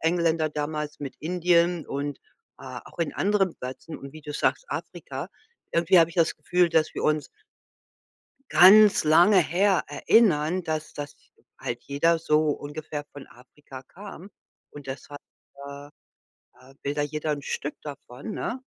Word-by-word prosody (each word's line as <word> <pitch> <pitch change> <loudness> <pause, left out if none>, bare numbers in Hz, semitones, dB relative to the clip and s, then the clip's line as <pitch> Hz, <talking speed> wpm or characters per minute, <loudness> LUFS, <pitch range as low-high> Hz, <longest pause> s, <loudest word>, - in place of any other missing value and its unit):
Engländer 165 -1 +1
damals 150 0 -4
mit 140 -2 -6
Indien 175 0 +1
und, 140 +1 -4 0.4
äh, 130 -2 -8
auch - - -16
in 165 -3 -1
anderen 195 -3 +1
Plätzen 130 +5 -8
und 140 0 -11
wie 155 - -11
du 150 0 -7
sagst 325 - 0
Afrika. - - -6 0.4
Irgendwie 170 +2 +4
habe 165 0 +4
ich 170 - -15
das 165 -2 +2
Gefühl, 180 -1 +2
dass 160 -2 +1
wir - - -4
uns 155 -1 +1 1.3
ganz 195 +6 +7
lange 170 +6 +6
her 180 +4 +2
erinnern, 170 0 +2
dass 155 -1 -3
das 145 0 -7 0.4
halt 120 0 -5
jeder 165 +4 +2
so 155 -1 +2
ungefähr 145 +1 -5
von 140 -1 -11
Afrika 130 +2 -14
kam, 195 +4 -11 0.4
und 145 -2 -11
deshalb, 145 +2 -8 0.5
äh 140 0 -9 0.7
äh, 130 +1 -18
will 140 - -1
da 145 - -1
jeder 150 +1 -2
'n 145 -1 -2
Stück 145 +1 -4
davon, 140 - -8
ne? - - -3
155 Hz, 150 wpm, -26 LUFS, 145-175 Hz, 1.3 s, ganz